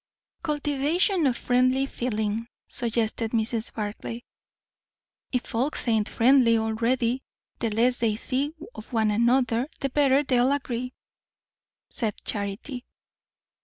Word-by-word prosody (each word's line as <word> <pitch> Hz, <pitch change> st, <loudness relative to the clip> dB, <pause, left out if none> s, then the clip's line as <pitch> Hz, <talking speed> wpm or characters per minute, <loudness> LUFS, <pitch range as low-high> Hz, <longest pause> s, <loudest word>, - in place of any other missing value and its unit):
"Cultivation 300 Hz, +4 st, +1 dB
of 245 Hz, -3 st, 0 dB
friendly 255 Hz, +2 st, +2 dB
feeling," 225 Hz, -3 st, -2 dB, 0.2 s
suggested 230 Hz, -1 st, -1 dB
Mrs. 225 Hz, 0 st, 0 dB
Barclay. 220 Hz, +2 st, -5 dB, 1.1 s
"If 250 Hz, -2 st, 0 dB
folks 255 Hz, +4 st, -1 dB
ain't 220 Hz, -3 st, +2 dB
friendly 240 Hz, -1 st, +5 dB
already, 230 Hz, +3 st, 0 dB, 0.4 s
the 230 Hz, -, 0 dB
less 240 Hz, +4 st, +2 dB
they 225 Hz, -3 st, +1 dB
see 275 Hz, +7 st, -1 dB, 0.2 s
of 215 Hz, +1 st, -11 dB
one 220 Hz, -3 st, +2 dB
another 235 Hz, +2 st, +2 dB
the 275 Hz, -, -2 dB
better 280 Hz, 0 st, +4 dB
they'll 255 Hz, 0 st, +3 dB
agree," 250 Hz, -3 st, -3 dB, 0.9 s
said 220 Hz, -5 st, -1 dB
Charity. 210 Hz, +6 st, -3 dB
240 Hz, 110 wpm, -26 LUFS, 225-265 Hz, 1.1 s, friendly